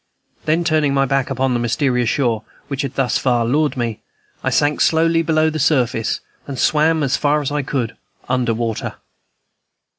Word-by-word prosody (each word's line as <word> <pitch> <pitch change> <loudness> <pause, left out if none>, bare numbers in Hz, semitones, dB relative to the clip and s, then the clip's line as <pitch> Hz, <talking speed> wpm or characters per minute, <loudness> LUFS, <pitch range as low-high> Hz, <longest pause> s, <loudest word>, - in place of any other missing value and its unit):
Then, 160 +2 +2
turning 155 -4 +2
my 135 0 +3
back 135 -1 0
upon 135 -1 0
the 120 - 0
mysterious 125 0 +1
shore 120 -6 0 0.3
which 140 -1 -2
had 135 -1 -4
thus 135 -2 +1
far 120 -3 +1
lured 145 +4 +1
me, 115 -3 -2 0.4
I - - +1
sank 145 0 +1
softly 165 +1 +3
below 160 -1 +2
the 155 - -3
surface, 130 -7 +1 0.3
and 140 -2 -5
swam 155 +3 +2
as 135 -1 +1
far 150 +1 +2
as 145 -1 -3
I 145 0 0
could 125 -4 -3 0.3
under 125 -2 +1
water. 115 -1 -3
135 Hz, 175 wpm, -19 LUFS, 120-150 Hz, 0.4 s, my